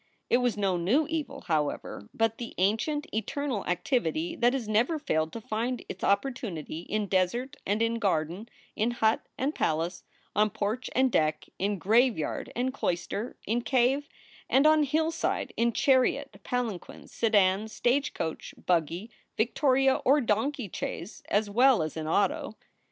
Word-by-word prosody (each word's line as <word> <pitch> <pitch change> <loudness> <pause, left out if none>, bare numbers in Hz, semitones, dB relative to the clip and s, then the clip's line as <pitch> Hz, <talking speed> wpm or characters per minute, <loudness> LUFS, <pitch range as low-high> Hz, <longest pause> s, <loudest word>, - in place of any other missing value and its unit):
It - - +6
was 245 -3 0
no 195 -3 +1
new 225 - +2
evil, 315 -2 -4
however, 150 - -2
but 225 0 0
the 235 - -6
ancient, 225 - +1
eternal 225 +1 -2
activity 175 - 0
that 240 +1 +3
has 255 -5 -2
never 230 +9 +2
failed 160 - -1
to - - -5
find 230 +3 -3
its 185 - -7
opportunity 200 - -1
in 215 0 0
desert 200 +8 0
and 210 +3 +1
in 230 0 0
garden, 185 +2 -1 0.3
in 220 +3 +1
hut 225 -2 +1
and 275 +3 0
palace, 165 - -1 0.3
on 210 +1 +4
porch 215 +4 -3
and 260 0 +3
deck, 155 -4 +1
in 200 +1 0
graveyard 220 - +1
and 255 +2 -1
clois 175 -10 -1
ter, 220 +5 -4
in 235 +3 0
cave 265 +4 +1 0.4
and 270 +3 +4
on 310 0 +6
hillside, 320 +4 -1
in 235 +1 +2
chariot, 270 +3 +2
palanquin, 235 -7 -4
sedan, 205 -2 +2
stage 245 +5 0
coach, 160 -1 -4
buggy, 175 +5 0 0.3
Victoria, 265 +3 +3
or 280 +3 +5
donkey 240 +1 0
chaise 180 +4 -5
as 210 +1 +2
well 240 -1 +4
as 155 - -5
in 155 -1 -4
auto. 280 - 0
225 Hz, 150 wpm, -28 LUFS, 190-260 Hz, 0.4 s, It